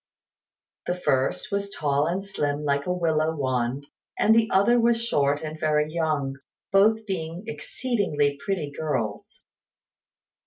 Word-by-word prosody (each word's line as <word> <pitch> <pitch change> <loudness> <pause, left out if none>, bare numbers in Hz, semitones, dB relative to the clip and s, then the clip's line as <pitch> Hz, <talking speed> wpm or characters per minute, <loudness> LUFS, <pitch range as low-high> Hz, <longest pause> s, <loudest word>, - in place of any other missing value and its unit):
The 175 - 0
first 130 -6 0
was 200 0 -1
tall 145 -4 0
and 185 +4 -2
slim 150 -6 -2
like 140 +1 0
a - - +1
willow 160 -3 +1
wand; 130 -1 -1 0.3
the 220 +1 +4
other 205 +6 +4
was 235 0 +3
short 145 -11 +1
and 155 0 -6
very 155 -1 +1
young, 150 -5 -1 0.3
both 215 +3 +4
being 170 -2 -4
exceedingly 200 - -1
pretty 155 -5 -2
girls. 120 -10 -3
160 Hz, 125 wpm, -25 LUFS, 145-195 Hz, 0.3 s, the